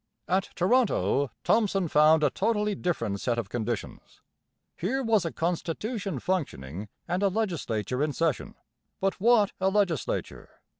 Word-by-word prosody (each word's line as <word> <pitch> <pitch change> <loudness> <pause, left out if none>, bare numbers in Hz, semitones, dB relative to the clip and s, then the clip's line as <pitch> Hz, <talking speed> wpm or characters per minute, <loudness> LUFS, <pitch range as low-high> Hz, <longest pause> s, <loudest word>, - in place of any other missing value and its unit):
At 190 +1 +1
Toronto 180 - +2
Thomson 200 -5 +2
found 155 +1 +5
a 145 - +3
totally 210 0 0
different 115 - -2
set 120 -2 0
of 120 - -3
conditions. 120 -1 -5 0.5
Here 260 +10 -1
was 220 -6 +2
a 165 - -2
constitution 180 - -2
functioning 105 - -3 0.2
and 180 +2 -1
a 200 - +4
legislature 160 - -2
in 150 0 +1
session; 160 -2 -1 0.4
but 195 0 -1
what 220 -2 +5
a 190 0 +2
legislature! 195 -7 -2
180 Hz, 135 wpm, -27 LUFS, 140-205 Hz, 0.5 s, found